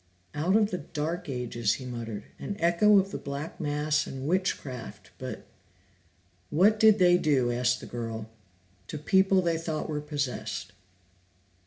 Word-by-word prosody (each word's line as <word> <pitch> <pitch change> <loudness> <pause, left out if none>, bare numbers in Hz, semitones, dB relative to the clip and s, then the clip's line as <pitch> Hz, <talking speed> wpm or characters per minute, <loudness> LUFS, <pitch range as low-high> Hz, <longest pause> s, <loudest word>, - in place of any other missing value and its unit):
"Out 160 +7 +1
of 215 -1 +3
the 180 - -2
Dark 165 +2 -4
Ages," 120 -4 -1
he 130 - -6
muttered. 115 -4 -5 0.2
"An 205 - -4
echo 175 +5 +5
of 195 0 +2
the - - -4
Black 140 +3 -6
Mass 150 0 0
and 135 +1 -5
witchcraft, 155 -8 -2
but - - -6 0.5
" 90 0 -37 0.3
"What 205 +7 +4
did 220 -1 +7
they 180 -2 +5
do," 135 -7 +2
asked 125 +1 +1
the - - -8
girl, 115 -2 -5 0.6
"to - - -5
people 190 +4 +3
they 165 -1 +1
thought 160 -2 -3
were 150 -2 -3
possessed?" 130 -9 -3
150 Hz, 155 wpm, -28 LUFS, 125-180 Hz, 0.6 s, did